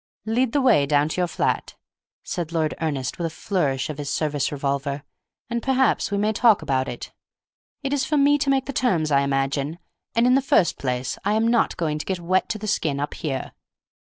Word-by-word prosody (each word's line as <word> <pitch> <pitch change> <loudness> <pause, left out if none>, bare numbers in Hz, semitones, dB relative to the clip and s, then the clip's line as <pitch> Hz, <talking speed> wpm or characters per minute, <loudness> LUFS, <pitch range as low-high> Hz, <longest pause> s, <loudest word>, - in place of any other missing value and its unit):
"Lead 230 +2 +1
the 285 - +2
way 220 - +4
down 145 +1 +2
to 180 - -1
your 180 - +1
flat," - - -1 0.5
said 170 -3 -4
Lord 160 -2 0
Ernest, 140 -4 -2
with 170 - 0
a - - -4
flourish 155 -6 -1
of 150 -1 -6
his 145 -1 -4
service 150 -3 -1
revolver, 140 0 -2 0.4
"and 235 0 -2
perhaps 265 +1 +2
we 200 - -1
may 210 +2 +1
talk 220 -5 +4
about 135 -3 0
it. 120 - -7 0.7
It 275 0 -1
is 280 -2 +1
for 300 +2 0
me 290 +1 +4
to 280 -1 0
make 270 -1 +2
the 275 - -5
terms, 180 - +1
I 140 -1 +4
imagine, 140 +2 -1 0.4
and 230 +1 +4
in 250 - +5
the 270 - +4
first 200 -9 +2
place 125 -1 -2
I 205 - +1
am 220 +1 +2
not 235 0 +2
going 155 -3 -1
to - - -5
get 190 -2 -1
wet 185 +2 +1
to 215 - -2
the 215 - -7
skin 155 -9 0
up 145 - -3
here." 135 -5 -4
165 Hz, 215 wpm, -23 LUFS, 140-230 Hz, 0.7 s, in